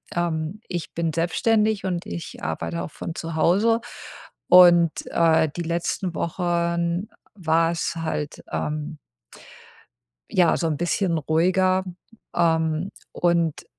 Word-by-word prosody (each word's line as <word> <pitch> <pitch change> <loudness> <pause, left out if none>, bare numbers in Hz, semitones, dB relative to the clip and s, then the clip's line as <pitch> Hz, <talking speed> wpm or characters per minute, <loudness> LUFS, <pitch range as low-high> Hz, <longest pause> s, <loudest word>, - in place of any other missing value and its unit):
ähm, 170 +3 -2
ich 175 -2 -5
bin 165 -1 -1
selbstständig 210 +5 +1
und 180 -2 -2
ich 85 0 -7
arbeite 85 0 -3
auch 80 - -7
von 165 - -7
zu 165 -1 -5
Hause 210 +8 +3 0.7
und, 175 -2 +7 0.2
äh, 160 -1 +3
die 175 - -3
letzten 170 +1 -2
Wochen 170 +2 -1 0.3
war's 165 -2 0
halt, 155 -2 -4
ähm 150 +1 -3 1.3
ja, 175 -3 +3
so 165 - 0
'n 155 -3 -1
bisschen 175 0 0
ruhiger. 185 +5 +2 0.5
Ähm, 160 +1 +1 0.2
und 170 -3 0
170 Hz, 115 wpm, -23 LUFS, 160-180 Hz, 1.3 s, und